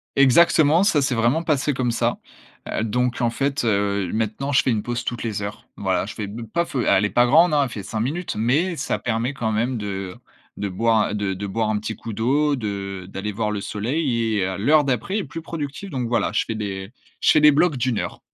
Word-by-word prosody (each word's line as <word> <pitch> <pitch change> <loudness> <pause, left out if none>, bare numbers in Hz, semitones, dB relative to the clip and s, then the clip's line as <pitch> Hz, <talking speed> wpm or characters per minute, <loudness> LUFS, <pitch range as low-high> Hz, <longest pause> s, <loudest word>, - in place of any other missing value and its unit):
Exactement, 155 +4 +5
ça 155 -8 +3
s'est 135 -1 0
vraiment 120 +9 +2
passé 145 -2 +1
comme 125 -2 0
ça. 115 - 0 0.5
Heu, - - -2
donc 125 +2 -1
en 120 - +3
fait, 140 +3 -1
heu, 100 -4 0
maintenant 110 +6 -2
je 140 - +4
fais 130 - +1
une 105 -2 0
pause 120 0 -3
toutes 120 - -3
les 105 -3 -3
heures. 105 +1 -7
Voilà, - - 0
je - - -7
fais 105 - -4
be 110 +4 -7
pas 170 +11 -1
feu, 130 -6 -2
elle 100 +2 +4
est - - 0
pas 120 - +4
grande 160 +6 +5
hein, 145 -1 +4
elle 135 - -2
fait 105 -4 -6
5 110 - -4
minutes, 165 +7 -3
mais 140 +12 +1
ça - - -2
permet 120 +3 -1
quand 115 -5 -2
même 120 +4 0
de 95 -3 -5 0.4
de 100 - -2
boire, 110 +2 +1
de 100 -2 -1
de 100 +2 -5
boire 110 +2 -1
un 110 - +1
petit 110 +1 -4
coup 115 - -7
d'eau, 140 +7 +1
de 100 -5 -5
d'aller 100 +2 -4
voir 105 +1 -2
le 100 -1 -3
soleil 115 0 -1
et 95 - +1
à 95 0 -3
l'heure 150 +8 +4
d'après 135 - -1
est - - -2
plus 155 +3 -7
productive. 160 +3 -5
Donc 125 -3 -2
voilà, 120 0 0
je - - +2
fais 110 - -4
des 100 -1 -5 0.3
je - - +3
fais 155 - +5
des 150 0 +8
blocs 150 0 +2
d'1 125 -3 0
heure. - - -5
115 Hz, 240 wpm, -22 LUFS, 105-140 Hz, 0.5 s, des